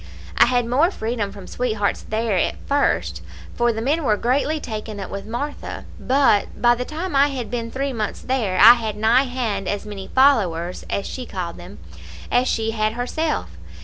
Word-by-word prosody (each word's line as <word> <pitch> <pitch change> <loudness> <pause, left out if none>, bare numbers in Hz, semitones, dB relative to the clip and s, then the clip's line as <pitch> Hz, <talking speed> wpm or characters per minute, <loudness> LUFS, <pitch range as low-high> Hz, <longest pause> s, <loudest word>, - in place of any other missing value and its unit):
I - - +6
had 245 -1 +2
more 270 +9 +3
freedom 220 - -3
from 200 -2 -10
sweethearts 215 -4 -1
there 220 -1 -1
at 180 - +1
first, 285 0 0 0.3
for 240 0 +2
the 225 0 -4
men 305 +6 +1
were 210 -6 +2
greatly 280 +7 0
taken 215 -4 -6
up 195 - -6
with 200 +1 -6
Martha; 280 +6 -5
but 265 -6 +2
by 240 0 +5
the 250 +1 -3
time 320 +2 -4
I 275 +1 +5
had 260 -5 -5
been 230 -2 -3
three 270 +3 -3
months 215 -3 -3
there 230 -8 -1
I 230 +5 +10
had 220 -3 -3
nigh 230 +5 +4
hand 230 -7 -3
as 205 0 -2
many 200 -2 -7
followers, 185 -11 +2
as 200 - -2
she 255 -2 -6
called 175 -3 -5
them, - - -11 0.5
as 250 +1 +3
she 225 0 0
had 215 -1 0
herself. 245 - -2
235 Hz, 185 wpm, -22 LUFS, 210-260 Hz, 0.5 s, I